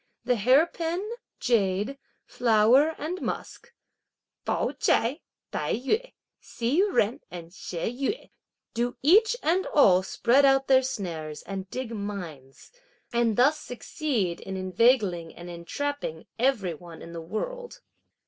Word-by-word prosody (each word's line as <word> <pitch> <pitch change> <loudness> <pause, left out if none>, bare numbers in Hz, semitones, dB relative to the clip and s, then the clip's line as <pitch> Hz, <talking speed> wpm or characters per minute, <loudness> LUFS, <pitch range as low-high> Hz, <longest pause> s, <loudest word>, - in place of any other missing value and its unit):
The 250 - +3
hair 255 +8 +5
pin, 340 +3 -3 0.3
jade, 210 +2 +1 0.3
flower 245 +7 +4
and 335 +5 -4
musk - - -5 0.7
(Pao - - 0
ch'ai, 255 +8 +2 0.3
Tai - - -1
yü, 430 - -1 0.3
Hsi 245 +8 -1 0.2
Jen 215 +4 +2
and 170 -1 -9
She 180 - -7
Yüeh) 260 - -3 0.4
do 240 +1 -1
each 430 - +5
and 360 +4 +1
all 190 -11 +5
spread 240 +8 +2
out 270 0 +4
their 260 -1 +5
snares 165 - -5
and 195 -1 -6
dig 255 0 -5
mines, 180 -11 -7 0.4
and 235 -2 +2
thus 285 +5 +4
succeed 235 - -3
in 190 0 -6
inveigling 185 -3 +2
and 175 0 -9
entrapping 170 - -4
every 230 -9 +1
one 170 +1 -11
in 170 - -10
the 165 - -6
world." 485 - -5
235 Hz, 130 wpm, -27 LUFS, 185-280 Hz, 0.7 s, hair